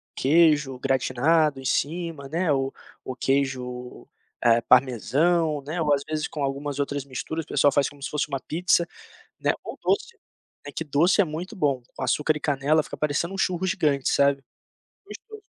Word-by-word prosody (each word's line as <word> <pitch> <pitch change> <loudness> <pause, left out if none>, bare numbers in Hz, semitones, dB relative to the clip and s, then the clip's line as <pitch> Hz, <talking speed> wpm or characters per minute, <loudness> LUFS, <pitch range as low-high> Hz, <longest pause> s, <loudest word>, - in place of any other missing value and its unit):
queijo 150 -2 +3
gratinado 135 +3 +2
em - - -11
cima, 160 0 -2
né, 165 +1 0
ou 135 -1 0 0.3
o 130 - -5
queijo, 125 -2 -2 0.4
eh, 115 0 +5
parmesão, 145 +6 +2
né, 160 +4 -3
ou, 150 -2 +3
às 140 - +1
vezes, 155 -1 -2
com 150 - -5
algumas 140 +1 -3
outras 140 -1 -2
misturas, 150 +4 -5
o - - -41
pessoal 145 - +3
faz 140 0 +2
como 145 -1 -12
se - - -3
fosse 150 0 -1
uma 140 -2 -3
pizza, 170 +1 +1 0.5
né, - - +1
ou - - -8
doce, 470 -1 0 0.5
né, 145 - -7
que 160 - -4
doce 155 +7 +2
é 200 - +6
muito 170 +6 -6
bom, 140 - 0
com - - -10
açúcar 150 +4 +1
e - - -9
canela 145 +2 +2
fica - - -8
parecendo 150 +4 -1
um - - -5
churros 185 -1 0
gigante, 150 -9 0
sabe, 140 -1 +3 0.7
gostoso. 435 -1 -11
145 Hz, 175 wpm, -25 LUFS, 135-165 Hz, 0.7 s, é